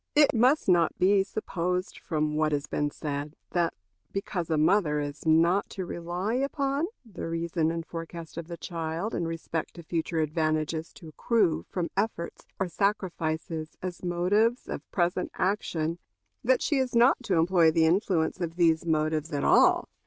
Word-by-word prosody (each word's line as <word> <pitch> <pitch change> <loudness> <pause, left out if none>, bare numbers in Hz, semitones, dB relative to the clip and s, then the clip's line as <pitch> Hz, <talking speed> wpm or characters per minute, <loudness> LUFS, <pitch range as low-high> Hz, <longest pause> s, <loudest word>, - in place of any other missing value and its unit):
It 295 -1 +6
must 255 +6 +3
not 175 -3 +3
be 195 +2 +4
supposed 180 -2 -3
from 155 -2 -1
what 155 0 +1
has 145 0 0
been 145 0 -1
said 145 +1 -5 0.2
that 170 -2 +1 0.4
because 180 -4 -3
a 160 - +2
mother 155 -1 +3
is 145 +1 -5
not 170 +5 +4
to 190 - -5
rely 175 +5 -3
upon 275 +3 0 0.2
the 210 -7 -7
reason 165 -1 0
and 165 0 -3
forecast 165 0 -7
of 170 -1 -6
the 170 -1 -6
child 165 +4 -4
in 170 - -1
respect 165 -1 -4
to 170 - -9
future 165 +1 -2
advantages 155 0 -1
to 165 - -12
accrue 175 0 +1
from 175 -2 -3
efforts 200 -4 -3
or 190 - +1
sacrifices 165 -5 -2
as 180 -1 -5
motives 200 +7 +1
of - - -6
present 180 0 0
action, 170 -4 -1 0.4
that - - +3
she 290 - +1
is 260 -2 0
not 245 +3 +5
to 200 -7 0
employ 170 0 +4
the 160 0 +3
influence 175 -1 +1
of 165 -1 -3
these 170 -1 +3
motives 155 0 0
at 145 -1 -1
all. - - +5
170 Hz, 165 wpm, -28 LUFS, 160-195 Hz, 0.4 s, It